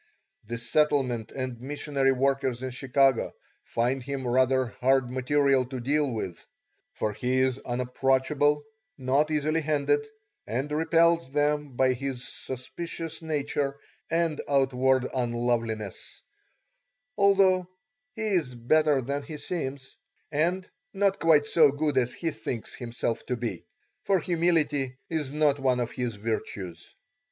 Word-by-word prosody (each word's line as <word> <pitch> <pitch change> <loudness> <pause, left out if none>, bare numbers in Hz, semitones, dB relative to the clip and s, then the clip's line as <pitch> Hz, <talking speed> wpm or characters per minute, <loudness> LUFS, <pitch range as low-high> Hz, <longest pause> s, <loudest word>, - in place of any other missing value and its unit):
The 120 +1 -3
settlement 125 -2 +1
and 130 -3 -5
missionary 140 0 0
workers 135 -1 0
in 130 - -3
Chicago 135 0 +2 0.3
find 125 +3 0
him 135 0 -4
rather 130 0 +2
hard 130 -1 +3
material 135 +1 +2
to 130 +1 -6
deal 145 +3 +1
with, 95 -6 -5 0.5
for 105 - -2
he 125 +4 -1
is 130 0 +2
unapproachable, 135 +4 +1 0.3
not 140 +3 +2
easily 155 +1 +1
handled, 155 - +1 0.4
and 130 +6 -2
repels 165 0 +3
them 145 -1 0
by 130 0 +3
his 125 -1 -4
suspicious 160 +7 -6
nature 145 -3 -1 0.3
and 165 -2 0
outward 130 -2 +3
unloveliness, 120 -4 -2 0.9
although 195 -3 +4 0.5
he 225 - -3
is 175 -12 0
better 145 +4 +3
than 140 +3 -2
he 150 +2 -8
seems, 140 -5 -5 0.4
and 175 +5 0 0.3
not 195 0 +2
quite 155 -3 +5
so 150 -1 +5
good 145 0 -1
as 125 -1 0
he 165 -2 -2
thinks 110 -2 -5
himself 115 -1 -3
to 125 - -1
be, 115 -7 -4 0.3
for 195 -2 +2
humility 155 -6 +1
is 155 -4 -1
not 150 -1 +2
one 130 -2 +2
of 120 -1 -2
his 125 -3 -3
virtues. 100 -4 -5
135 Hz, 125 wpm, -27 LUFS, 125-150 Hz, 0.9 s, quite